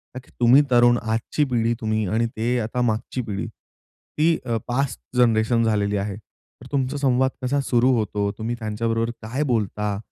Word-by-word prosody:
ताकी 130 -1 -10
तुम्ही 125 +4 +6
तरुण, 120 0 +5
आजची 115 +6 -1
पिढी 115 -1 +1
तुम्ही 110 -1 0
आणि 115 +5 +1
ते 120 +3 0
आता 120 +2 -2
मागची 120 +2 -1
पिढी, 105 -4 -4
ती 160 +2 -3
अ, 115 -1 0
पास्ट 130 +2 -1 0.2
जनरेशन 115 -1 +3
झालेली 105 -2 +1
आहे. 100 0 -3
तर 105 - -19
तुमचा 140 0 -1
संवाद 130 -1 +2
कसा 140 +3 +1
सुरु 125 0 +2
होतो? 105 -1 -1
तुम्ही 115 +2 -3
त्यांच्याबरोबर 115 +1 -1
काय 125 +7 -2
बोलता? 105 -1 -1
115 Hz, 160 wpm, -23 LUFS, 110-125 Hz, 0.2 s, तुम्ही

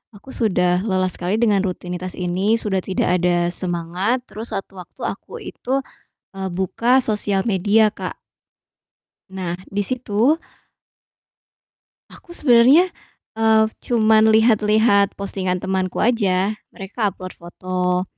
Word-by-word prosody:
aku 265 +7 -13
sudah 180 -5 +1
lelah 185 -2 0
sekali 180 +4 -1
dengan 215 -3 +2
rutinitas 180 -1 -4
ini, 185 +5 0
sudah 200 -4 -1
tidak 180 -1 0
ada 175 0 +1
semangat, 180 +8 -1
terus 225 -1 -8
sewaktu-waktu 190 -2 -8
aku - - -5
itu, 250 - -8 0.6
eee, 190 -1 -4
buka 230 +8 +1
sosial 210 -2 +1
media, 210 +2 +3
Kak. - - -6 1.2
Nah, 180 -2 -4 0.2
di 205 - -1
situ 250 +4 +1 1.8
aku 345 -1 -11
sebenernya, 275 +7 +5 0.5
eee, 220 0 +4 0.2
cuman 220 -2 +3
lihat-lihat 215 -2 +3
postingan 185 -2 -2
temanku 190 -1 -2
aja, 205 -4 +1 0.2
mereka 200 +2 -3
upload 185 0 -8
foto. 180 +1 -3
195 Hz, 110 wpm, -20 LUFS, 185-220 Hz, 1.8 s, sebenernya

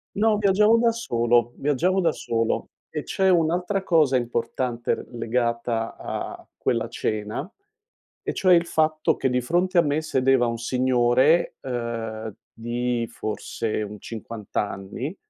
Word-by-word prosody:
No, 215 +1 +3
viaggiavo 210 +2 +4
da 230 0 +4
solo, 120 - +1
viaggiavo 160 +7 +1
da 165 -2 +3
solo 115 -5 -1 0.2
e - - -4
c'è 190 0 +1
un'altra 180 +3 +1
cosa 155 -7 +3
importante 120 0 -1
r - - -9
legata 115 -1 -1
a - - -6
quella - - 0
cena, 110 - -3 0.8
e - - -2
cioè 185 -2 +5
il 170 0 +3
fatto 155 -2 +1
che 135 - 0
di 125 0 +1
fronte 175 +8 +1
a - - +8
me 150 -1 0
sedeva 130 -4 +2
un 115 0 -2
signore, 130 +5 +2
uhm, 115 -3 -4 0.2
di 120 +1 -2
forse 110 0 -3
un 105 0 -7
50 110 -1 -8
anni 105 - -3
125 Hz, 135 wpm, -24 LUFS, 115-170 Hz, 0.8 s, a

